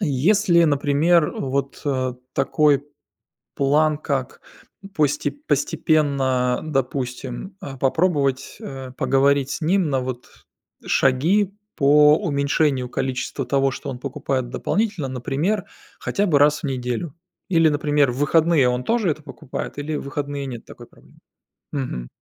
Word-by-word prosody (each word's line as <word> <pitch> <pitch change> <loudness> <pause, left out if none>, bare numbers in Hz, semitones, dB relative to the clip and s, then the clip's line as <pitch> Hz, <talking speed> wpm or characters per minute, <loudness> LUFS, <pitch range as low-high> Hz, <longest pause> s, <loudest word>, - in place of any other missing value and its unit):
если, 170 +3 +3
например, 150 +2 +3
вот, 135 +1 -3
э, 130 -3 -1 0.2
такой 145 +1 +2 0.7
план 150 +2 +2
как, 135 -4 -3 0.5
посте 150 -3 +1
постепенно, 140 - +1
допустим, 135 +3 -3
а, 140 -7 -7
попробовать, 140 -1 0
э, 130 -2 -7
поговорить 140 0 +2
с - - -3
ним 175 0 +1
на 135 -2 +1
вот, 125 -1 -5 0.6
шаги 180 +10 +2 0.2
по 150 +1 +6
уменьшению 140 -3 +1
количества 130 +2 -3
того, 135 +1 +2
что 135 - -6
он 125 - -6
покупает 135 -2 -3
дополнительно. 200 - -1
Например 145 - -1 0.3
хотя 205 - -1
бы 155 -6 +3
раз 145 +1 +4
в - - -13
неделю 130 +3 -3 0.3
или 165 -3 +4
например 145 -2 +2
в 125 - -7
выходные 155 -2 +3
он 125 0 -1
тоже 225 -7 +1
это 155 +1 -4
покупает 140 -1 -7
или 150 +1 -3
в - - -4
выходные 140 0 -4
нет 120 -4 -7
такой - - -12
проблемы? - - -22 0.5
Мгм. 125 - -4
140 Hz, 130 wpm, -22 LUFS, 130-155 Hz, 0.7 s, по